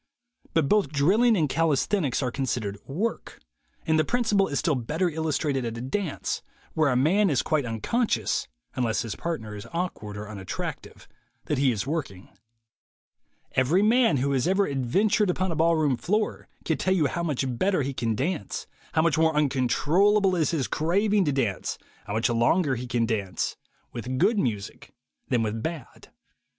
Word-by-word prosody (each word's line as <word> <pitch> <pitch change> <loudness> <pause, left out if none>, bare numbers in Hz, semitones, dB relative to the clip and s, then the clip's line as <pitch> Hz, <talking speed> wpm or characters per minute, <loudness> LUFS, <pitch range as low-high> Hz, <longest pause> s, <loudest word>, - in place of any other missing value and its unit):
But 160 -4 +3
both 210 -3 +3
drill 155 +10 +2
ing 240 -3 +5
and 155 -4 +2
calisthenics 155 - +1
are 125 - -1
considered 120 -6 -2
"work," 200 +12 -3 0.5
and 160 0 +2
the - - +4
principle 210 -1 +2
is 140 - -2
still 160 +1 +1
better 150 +8 -1
illustrated 155 -4 -1
at 115 -1 -4
a - - -5
dance, 160 +6 -3 0.3
where 155 -2 +2
a 125 - +1
man 180 +10 +3
is 140 -5 +1
quite 150 -5 0
unconscious 115 - 0 0.3
(unless 115 -3 0
his 115 -3 -5
partner 110 -11 -4
is 105 +2 -8
awkward 165 - -4
or 105 0 -6
unattractive) 100 -3 -6 0.4
that 150 - -1
he 135 -2 +4
is 110 -2 -2
working. 140 - -4 1.2
Every 150 +10 +2
man 225 - +4
who 140 +2 0
has 135 +2 +1
ever 195 +2 +3
adventured 185 - +1
upon 185 0 0
a - - -2
ball 165 +2 +3
room 150 -4 +2
floor 210 - -1 0.2
can 160 - 0
tell 185 - 0
370U 155 -6 +3
how 170 - -3
much 135 -6 -2
better 190 -6 +2
he 135 +1 -3
can 115 -3 -1
dance, 155 - -3 0.3
how 160 - +3
much 165 -1 +2
more 160 -1 +3
uncontrollable 155 - +3
is 160 -4 +1
his 155 -6 0
craving 200 +5 +1
to 145 - +1
dance, 120 -9 -1 0.3
how 100 - -4
much 110 +2 +1
longer 130 +6 +2
he 125 +1 -5
can 120 -2 +1
dance, 100 -6 -2 0.4
with 125 +2 -4
good 215 - +3
music 105 - -4 0.3
than 120 -3 +2
with 110 +1 -2
bad. 160 -1 -6
145 Hz, 175 wpm, -26 LUFS, 120-180 Hz, 1.2 s, ing